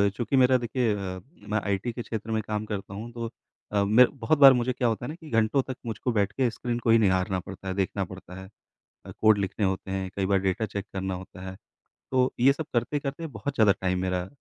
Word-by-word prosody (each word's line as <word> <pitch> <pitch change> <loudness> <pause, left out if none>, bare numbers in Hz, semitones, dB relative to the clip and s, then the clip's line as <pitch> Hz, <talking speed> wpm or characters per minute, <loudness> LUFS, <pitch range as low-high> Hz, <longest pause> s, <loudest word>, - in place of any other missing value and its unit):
चूँकि 120 +3 -1
मेरा 130 0 +5
देखिए 120 -2 0
अ, 95 -2 -5 0.3
मैं 105 +1 +1
आईटी 100 +4 -1
के 120 - -5
क्षेत्र 110 -1 -5
में 110 - +1
काम 105 0 -2
करता 100 -2 -5
हूँ, 115 +4 -7
तो 115 -1 -4 0.4
अ, 100 -1 +2
मैं 110 +5 +6
बहुत 130 +6 +2
बार 135 -2 +10
मुझे 125 +1 0
क्या 125 -1 0
होता 115 +1 -1
है - - -5
ना 155 - -5
कि 160 -3 -13
घंटों 115 +3 +2
तक 130 - -4
मुझको 115 +2 -2
बैठ 100 -3 +1
के 130 -3 +1
स्क्रीन 120 0 -3
को 120 - -2
ही 115 - +7
निहारना 95 -3 +2
पड़ता 95 +1 -9
है, 95 - -1
देखना 95 +1 -1
पड़ता 95 0 -10
है। 95 - -11 0.6
अ - - -8
कोड 110 -1 +6
लिखने 100 +1 -1
होते 95 0 -2
हैं, 95 -1 -2
कई 95 - 0
बार 100 0 +2
डेटा 95 +3 0
चेक 100 -1 -5
करना 95 0 -2
होता 90 0 -10
है। 95 - -8 0.6
तो 130 0 +2
ये 130 +3 +6
सब 155 +2 -5
करते-करते 140 +6 -2
बहुत 135 +1 -5
ज़्यादा 110 -4 +5
टाइम 90 -1 0
मेरा 90 -1 -1
110 Hz, 235 wpm, -27 LUFS, 95-120 Hz, 0.6 s, बार